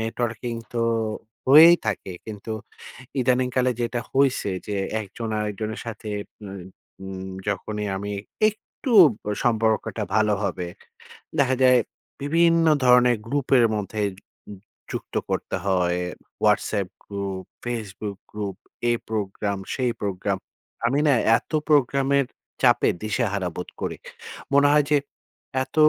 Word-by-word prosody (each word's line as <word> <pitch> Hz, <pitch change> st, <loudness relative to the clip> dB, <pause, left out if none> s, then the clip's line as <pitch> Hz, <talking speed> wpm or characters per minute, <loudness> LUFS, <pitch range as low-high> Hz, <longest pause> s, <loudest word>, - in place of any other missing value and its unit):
Networking 115 Hz, +1 st, -2 dB, 0.2 s
তো 115 Hz, -, +1 dB, 0.6 s
হয়েই 160 Hz, +5 st, +9 dB
থাকে। 95 Hz, -, -2 dB
কিন্তু 110 Hz, 0 st, -6 dB, 0.7 s
ইদানিং 125 Hz, 0 st, +2 dB
কালে 130 Hz, -1 st, +3 dB
যেটা 120 Hz, 0 st, -1 dB
হইছে 135 Hz, -6 st, +2 dB, 0.2 s
যে, 105 Hz, -, -2 dB, 0.3 s
একজন 110 Hz, +3 st, -6 dB
আরেকজনের 105 Hz, +1 st, -3 dB
সাথে 110 Hz, -1 st, -6 dB, 0.4 s
মায় 95 Hz, -2 st, -7 dB, 0.4 s
উম 95 Hz, 0 st, -6 dB, 0.2 s
যখনই 105 Hz, +1 st, -2 dB
আমি 100 Hz, +1 st, -4 dB, 0.4 s
একটু 215 Hz, +4 st, -7 dB, 0.3 s
ব -, -, -36 dB, 0.2 s
সম্পর্কটা 110 Hz, -1 st, +1 dB
ভালো 105 Hz, -1 st, +3 dB
হবে, 90 Hz, -2 st, -2 dB, 0.7 s
দেখা 130 Hz, -2 st, +3 dB
যায় 125 Hz, -1 st, +7 dB, 0.4 s
বিভিন্ন 165 Hz, +3 st, +3 dB, 0.2 s
ধরনের 125 Hz, -1 st, +6 dB
গ্রুপের 135 Hz, -1 st, +3 dB
মধ্যে 105 Hz, +1 st, -3 dB
উ -, -, -12 dB
যু 100 Hz, -, -14 dB, 0.4 s
যুক্ত -, -, -6 dB, 0.2 s
করতে -, -, -2 dB
হয়। 90 Hz, -2 st, +2 dB, 0.5 s
Whatsapp 100 Hz, -4 st, +2 dB, 0.2 s
গ্রুপ, 100 Hz, -2 st, -4 dB, 0.2 s
Facebook 105 Hz, -4 st, -4 dB
গ্রুপ, 100 Hz, -3 st, -4 dB, 0.3 s
এই 120 Hz, -, +3 dB
প্রোগ্রাম, 100 Hz, -1 st, -2 dB, 0.2 s
সেই 125 Hz, -2 st, 0 dB
প্রোগ্রাম। 100 Hz, -1 st, -1 dB, 0.5 s
আমি 140 Hz, +3 st, +2 dB
না 145 Hz, -, +6 dB, 0.2 s
এত -, -, -13 dB, 0.2 s
প্রোগ্রামের 140 Hz, -1 st, +3 dB, 0.4 s
চাপে 120 Hz, -2 st, +5 dB
দিশাহারা 105 Hz, -4 st, 0 dB
বোধ 90 Hz, -, -5 dB
করি। -, -, -3 dB, 0.6 s
মনে 140 Hz, +1 st, +6 dB
হয় 150 Hz, -1 st, +4 dB
যে 150 Hz, -, +6 dB, 0.7 s
এত, -, -, -14 dB
110 Hz, 125 wpm, -24 LUFS, 100-130 Hz, 0.7 s, হয়েই